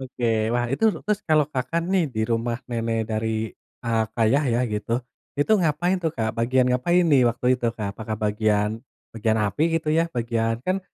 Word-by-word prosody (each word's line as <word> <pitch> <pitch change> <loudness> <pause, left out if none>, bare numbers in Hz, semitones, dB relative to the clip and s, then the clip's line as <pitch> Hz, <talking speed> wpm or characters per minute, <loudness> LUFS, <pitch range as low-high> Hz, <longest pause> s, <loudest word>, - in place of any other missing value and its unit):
Oke, 125 -2 -4 0.3
wah 120 0 +1
itu 135 - -3 0.2
terus 210 -1 0
kalau 155 -1 +4
Kakak 135 +6 -1
nih, 185 -3 +3
di 110 - -1
rumah 115 +1 0
nenek 115 -1 -1
dari, 110 0 -2 0.3
eee, 115 -1 +1 0.2
ayah 135 +7 +3
ya - - +2
gitu, 105 +2 -3 0.5
itu 145 +9 +2
ngapain 175 +4 +1
tuh, 160 - +1
Kak? 110 -2 -1
Bagian 125 +2 +2
ngapain 175 +8 +2
nih, 140 -5 +5
waktu 120 +1 -5
itu, 125 -2 -2
Kak? 100 -2 -3
Apakah 110 +1 -5
bagian 105 +1 +1 0.3
bagian 110 0 +1
api, 100 +8 -1 0.2
gitu 155 - -7
ya? 165 +1 +2
Bagian 115 -1 0
kan 185 +1 +1
120 Hz, 180 wpm, -24 LUFS, 110-150 Hz, 0.5 s, nih